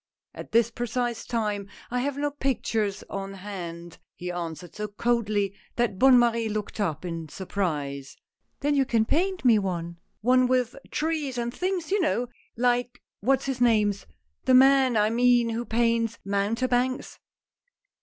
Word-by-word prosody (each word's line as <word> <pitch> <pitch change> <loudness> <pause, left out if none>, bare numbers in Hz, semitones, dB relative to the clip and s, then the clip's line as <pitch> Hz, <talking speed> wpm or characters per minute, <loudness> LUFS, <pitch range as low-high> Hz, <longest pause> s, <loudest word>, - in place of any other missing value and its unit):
" - - -67
At - - -9
this 230 0 +3
precise 240 0 -2
time 210 -4 -1 0.2
I 250 - 0
have 280 +2 -2
no 290 0 -1
pictures 225 -7 -1
on 195 0 -5
hand," 175 -4 -7 0.2
he 180 0 -5
answered 175 0 -6
so 210 0 -4
coldly, 210 -2 0 0.2
that 235 -6 0
Bonne 260 -1 +7
Marie 230 -2 +2
looked 210 0 -4
up 170 -5 -1
in 165 -2 -5
surprise. 145 -8 -3 0.2
" - - -49
Then 290 +1 +2
you 275 -1 +4
can 230 -4 +1
paint 365 - 0
me 230 -3 +6
one 170 -3 -4
— - - -48
one 250 +2 +4
with 250 -2 +1
trees 305 -5 -2
and 240 0 -2
things 365 0 -2
you 405 0 +2
know, 245 -7 0 0.3
like 245 0 +1 0.2
what's 265 +5 +1
his 265 -2 -3
name's 210 -5 +2 0.2
— 75 +1 -47
The 255 - +5
man 265 -2 +6
I 210 +1 +3
mean 240 0 +4
who 230 +1 -3
paints 230 0 +1
mountebanks." 245 +6 0
230 Hz, 165 wpm, -26 LUFS, 200-255 Hz, 0.3 s, Bonne